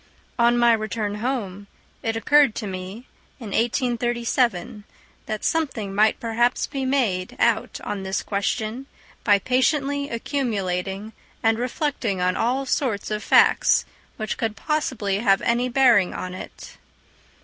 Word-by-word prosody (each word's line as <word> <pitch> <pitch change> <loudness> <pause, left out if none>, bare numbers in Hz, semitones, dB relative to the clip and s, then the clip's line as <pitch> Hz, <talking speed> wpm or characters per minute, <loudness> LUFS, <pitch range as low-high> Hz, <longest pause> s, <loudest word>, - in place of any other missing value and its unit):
On 235 +1 +4
my 240 -1 +5
return 215 -1 -2
home, 205 -6 -3 0.3
it 225 -1 -2
occurred 285 +1 +4
to 220 - -4
me, 190 +5 -7 0.3
in 225 -5 -7
1837, 235 -3 0 0.4
that 215 -1 -4
something 255 -11 -1
might 215 +2 +3
perhaps 240 +2 +1
be 275 -2 -4
made 225 -9 0
out - - +1
on 205 -1 -4
this 190 0 -2
question 220 +5 -2 0.4
by 205 -2 +5
patiently 280 - 0
accumulating 210 -5 -3 0.3
and 225 0 +3
reflecting 250 -5 -2
on 180 0 +1
all 255 +4 0
sorts 240 -7 -1
of 210 0 -2
facts - - +4 0.3
which 215 -1 -3
could 225 -2 -1
possibly 240 -11 -1
have 195 -3 +3
any 240 +2 +1
bearing 240 -7 +4
on 185 0 -5
it. 185 - -10
225 Hz, 130 wpm, -23 LUFS, 200-255 Hz, 0.4 s, my